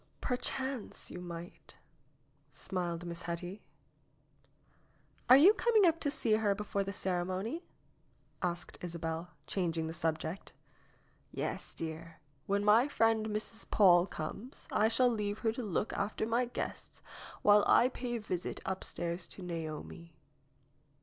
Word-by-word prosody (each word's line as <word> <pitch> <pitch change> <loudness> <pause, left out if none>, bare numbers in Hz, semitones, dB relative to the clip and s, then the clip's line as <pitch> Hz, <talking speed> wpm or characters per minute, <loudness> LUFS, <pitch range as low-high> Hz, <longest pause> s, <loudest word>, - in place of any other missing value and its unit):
"Perchance 260 -1 -3
you 180 - -7
might," 170 0 -7 0.8
smiled 175 -2 -3
Miss 170 -1 -5
Hetty. 175 +3 -4 1.7
"Are 255 - +11
you 355 +9 +8
coming 445 -3 +4
up 330 -1 +3
to 290 - 0
see 240 -5 +1
her 205 -2 +2
before 200 -1 -2
the 195 - -4
ceremony 190 - -2 0.4
?" - - -38
asked 175 0 -8
Isabel, 165 0 -4 0.2
changing 165 -4 -1
the 160 - -4
subject. 160 +2 -2 0.8
"Yes, - - -3
dear. 165 0 -6 0.3
When 200 +1 +1
my 225 +5 +6
friend, 225 -5 +2
Mrs. 215 +1 -4
Paule, 180 -3 +6
comes, 210 - -7
I 215 - +4
shall 230 +3 +4
leave 210 -3 -1
her 225 - +4
to 240 - -5
look 205 -1 -1
after 205 +2 -1
my 235 +3 +2
guests 245 - -5 0.4
while 205 0 +7
I 245 - +6
pay 245 -1 -4
a - - -2
visit 180 -4 -3
upstairs 175 -2 -3
to 190 - -8
Naomi." 165 -1 -6
200 Hz, 135 wpm, -33 LUFS, 170-225 Hz, 1.7 s, Are